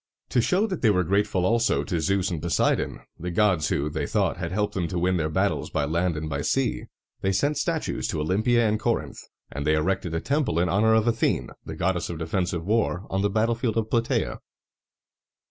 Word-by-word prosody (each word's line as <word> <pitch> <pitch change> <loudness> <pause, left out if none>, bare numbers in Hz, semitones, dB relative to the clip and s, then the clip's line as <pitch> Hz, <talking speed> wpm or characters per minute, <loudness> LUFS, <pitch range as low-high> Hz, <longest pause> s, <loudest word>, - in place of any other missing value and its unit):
To 120 - +2
show 185 - +2
that 190 -6 -4
they 110 - +4
were 90 -3 +3
grateful 95 0 +1
also 115 +3 +2
to 85 -6 -2
Zeus 95 +1 +1
and 80 -4 -3
Poseidon, 85 -1 0 0.2
the 90 - -4
gods 90 -3 +2
who, 70 - 0
they 75 - -3
thought, - - 0
had 85 -1 -4
helped 105 +2 -1
them 90 -4 -1
to 90 - -3
win 90 +1 +1
their 80 -2 0
battles 80 - 0
by 75 -2 0
land 85 +2 0
and 80 +1 -4
by 70 -2 -3
sea, 135 - 0 0.4
they 95 - +1
sent 145 +10 +1
statues 160 0 -1
to - - -2
Olympia 110 +9 +2
and 105 0 0
Corinth; - - -1 0.3
and 70 - -4
they 75 +1 +2
erected 85 +1 -1
a - - +1
temple 140 - 0
in 85 +1 +2
honor 110 +3 +3
of 110 +1 +2
Athene, 115 - 0 0.2
the - - -5
goddess 90 -1 -1
of 85 - -4
defensive 85 +1 -2
war, 105 -3 0
on 95 - 0
the 100 - +2
battlefield 115 +2 0
of 110 -1 -1
Platæa. 115 -1 0
95 Hz, 210 wpm, -25 LUFS, 85-110 Hz, 0.4 s, they